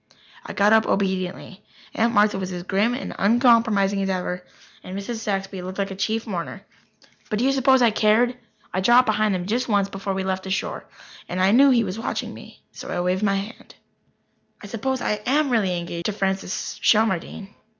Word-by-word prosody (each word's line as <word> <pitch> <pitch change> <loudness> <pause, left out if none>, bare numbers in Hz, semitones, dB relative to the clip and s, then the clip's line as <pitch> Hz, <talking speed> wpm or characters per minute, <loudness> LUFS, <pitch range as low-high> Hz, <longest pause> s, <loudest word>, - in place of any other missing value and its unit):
I - - -7
got 205 +2 +4
up 220 0 +4
obediently. 190 +1 -2 0.3
Aunt 230 +1 +1
Martha 205 -1 +3
was 185 -1 -4
as 175 -1 -5
grim 205 +6 +1
and 265 - -5
uncompromising 225 -3 +3
as 195 - -1
ever, 180 -1 -3 0.4
and 185 +1 -7
Mrs. 210 +4 -4
Saxby 195 -3 -3
looked 185 +1 -7
like 200 0 -2
a - - -5
chief 220 +4 -1
mourner, 190 0 -5 0.6
but 215 - -1
do 240 - 0
you 270 - +3
suppose 265 -1 +4
I 235 - +5
cared? 220 +4 +3 0.4
I 185 - 0
dropped 240 +5 +5
behind 215 -2 +1
them 180 -1 -3
just 235 +6 -1
once 200 -3 +1
before 195 0 -4
we 190 - -2
left 190 0 -3
the - - -5
shore. 190 - -3 0.4
I 185 +2 +2
knew 275 +5 +6
he 240 -3 +4
was 195 +1 -4
watching 225 - -4
me - - -14 0.2
and - - -7
I 180 - -2
waved 180 +2 0
my 200 -2 +2
hand. 200 +5 -7 0.8
I - - -11
suppose 240 +5 -3
I 210 0 -1
am 285 +1 +2
really 195 -7 +1
engaged 170 0 -5
to 210 - -1
Francis 195 -1 -3
Shelmardine. 210 -1 +1
200 Hz, 195 wpm, -23 LUFS, 190-225 Hz, 0.8 s, knew